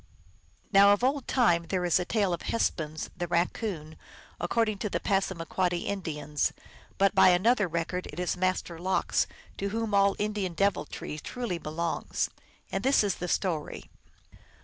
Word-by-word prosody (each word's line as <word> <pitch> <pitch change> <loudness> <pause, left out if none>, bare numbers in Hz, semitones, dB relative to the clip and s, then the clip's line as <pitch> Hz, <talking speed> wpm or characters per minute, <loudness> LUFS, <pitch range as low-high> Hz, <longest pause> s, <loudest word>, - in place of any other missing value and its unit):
Now 200 +1 +8
of 205 - -1
old 270 +1 +1
time 175 -10 +3
there 180 0 -1
is 175 0 +3
a 180 - -2
tale 200 -4 +1
of 170 - -3
Hespuns, 155 -8 -2
the 175 - -3
Raccoon, 170 -2 -2 0.4
according 215 +3 0
to 210 - -2
the - - -1
Passamaquoddy 180 -2 0
Indians, 150 -6 -2 0.4
but 195 -1 +3
by - - +7
another 205 +4 +3
record 170 +2 -3
it 150 - -8
is 180 - 0
Master 185 -2 -1
Lox, 185 +2 +1 0.3
to 200 - -1
whom 225 0 -2
all 200 0 +4
Indian 205 -4 -2
deviltry 195 -5 -1
truly 230 0 -4
belongs. 165 +2 -2 0.4
And - - -2
this 270 -3 +4
is 200 -2 0
the 180 - -4
story. 170 -4 -2
185 Hz, 150 wpm, -28 LUFS, 170-205 Hz, 0.4 s, Now